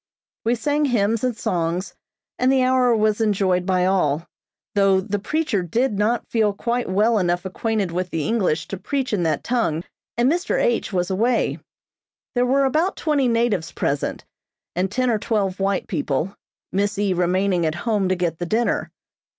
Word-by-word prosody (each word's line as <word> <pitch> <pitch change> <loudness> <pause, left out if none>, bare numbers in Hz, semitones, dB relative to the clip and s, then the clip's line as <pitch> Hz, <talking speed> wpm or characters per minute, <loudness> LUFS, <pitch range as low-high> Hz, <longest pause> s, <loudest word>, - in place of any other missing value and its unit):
We 235 +2 +3
sang 290 +6 0
hymns 230 -3 +1
and 250 -3 0
songs, 175 0 -2 0.5
and 255 +1 +3
the 265 -1 +3
hour 255 -2 +3
was 215 0 +1
enjoyed 190 -4 +1
by 185 -1 +2
all, 170 -5 +1 0.5
though 195 -2 +4
the 205 +1 -2
preacher 280 -2 0
did 210 +5 0
not 225 +3 +1
feel 215 -3 +1
quite 235 +4 -2
well 210 +4 +3
enough 175 0 0
acquainted 205 0 -1
with 180 +1 -2
the 160 -3 -2
English 195 -8 0
to 195 - -4
preach 270 -1 -2
in 200 - +1
that 160 -2 0
tongue, 200 -10 0 0.3
and 240 +1 +3
Mr. 350 +7 +1
H. 240 -2 +1
was 180 -1 -1
away. 230 +5 +1 0.7
There 245 0 +2
were 275 +2 +3
about 315 +8 +1
twenty 290 -5 +1
natives 230 -7 +1
present, 140 0 -2 0.5
and 185 +2 0
ten 255 +2 +1
or 220 - +1
twelve 200 -4 -1
white 195 -1 0
people, 160 +1 -2 0.4
Miss 205 +2 0
E. 200 -2 +1
remaining 180 +1 +1
at 155 - -2
home 210 -5 +1
to 185 - +2
get 170 -3 -2
the 175 - -3
dinner. 230 +5 0
205 Hz, 175 wpm, -22 LUFS, 180-240 Hz, 0.7 s, though